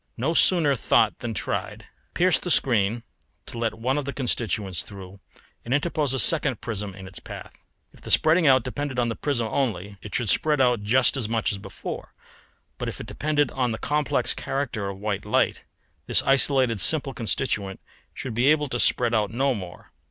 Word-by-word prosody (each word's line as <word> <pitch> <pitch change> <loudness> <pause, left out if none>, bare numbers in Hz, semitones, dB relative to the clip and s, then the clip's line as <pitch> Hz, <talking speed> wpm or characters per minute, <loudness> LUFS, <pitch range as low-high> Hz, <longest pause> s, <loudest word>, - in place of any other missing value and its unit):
No 135 +8 0
sooner 165 -5 +5
thought 110 -2 +2
than 115 -2 -4
tried. - - -3 0.3
Pierce 180 +1 +3
the 180 - -5
screen 115 - +2 0.4
to 115 - -7
let 115 -1 -1
one 130 +5 0
of 145 - -5
the 140 - -3
constituents 110 - -2
through 95 -1 -11 0.4
and 125 +3 0
interpose 150 -2 0
a 135 - -1
second 135 -5 +2
prism 105 -5 -5
in 95 -1 -10
its 95 -2 -8
path. - - -10 0.4
If - - -19
the - - -9
spreading 160 +1 +4
out 130 -1 +5
depended 140 0 -4
on 120 -1 +1
the 115 - -3
prism 125 -6 -1
only 100 -7 -2
it 105 - -7
should 120 -4 0
spread 150 +5 +2
out 125 -4 +3
just 125 +6 +2
as 115 -5 -2
much 115 +2 0
as 100 - -5
before, 95 -1 -8 0.6
but - - -2
if - - -7
it - - -6
depended 145 -2 0
on 125 -3 -1
the - - -4
complex 150 +3 0
character 120 -8 -3
of 100 - -7
white 105 -1 -3
light, - - 0 0.4
this - - +3
isolated 130 -5 +3
simple 145 -4 +2
constituent 105 -5 -2 0.3
should 135 -3 -6
be 120 +4 +2
able 150 -1 +3
to 120 - -2
spread 120 0 +2
out 105 -3 +1
no 130 +4 +1
more. 90 -6 -9
120 Hz, 190 wpm, -25 LUFS, 105-140 Hz, 0.6 s, sooner